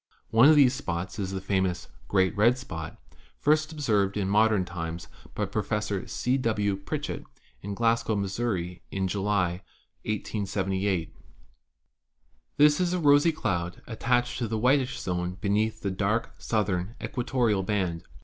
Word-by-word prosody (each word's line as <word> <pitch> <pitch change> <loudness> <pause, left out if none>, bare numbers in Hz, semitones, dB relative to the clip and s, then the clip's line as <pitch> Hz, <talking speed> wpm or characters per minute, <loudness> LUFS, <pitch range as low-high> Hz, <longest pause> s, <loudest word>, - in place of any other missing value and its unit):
One 115 +6 +7
of 155 - +7
these 135 -4 +6
spots 95 -3 -4
is 95 -2 -2
the 95 - -3
famous 95 -2 -1 0.2
"great 95 +1 +2
red 115 +5 +4
spot" 80 - -7 0.4
first 155 +1 +2
observed 105 -10 +1
in 100 -2 0
modern 105 -1 +3
times 85 -1 -5 0.3
by - - 0
Professor 105 -2 -2
C. 125 +2 0
W. 105 -5 0
Pritchett 95 0 -4 0.4
in 100 +1 -5
Glasgow, 115 0 +1
Missouri, 100 -3 -2
in 95 -1 -1
July, 95 -2 0 0.4
1878. 95 -4 -2 1.4
This 150 0 +5
is 180 -1 +1
a 180 - 0
rosy 145 +1 +5
cloud 90 - -3
attached 125 +2 0
to 120 - -1
the 110 +1 -2
whitish 130 +3 +2
zone 90 0 -3
beneath 105 +3 0
the 100 - -1
dark 100 +4 -1
southern 100 -1 -1
equatorial 120 -5 0
band. 95 -4 -1
105 Hz, 140 wpm, -27 LUFS, 95-120 Hz, 1.4 s, One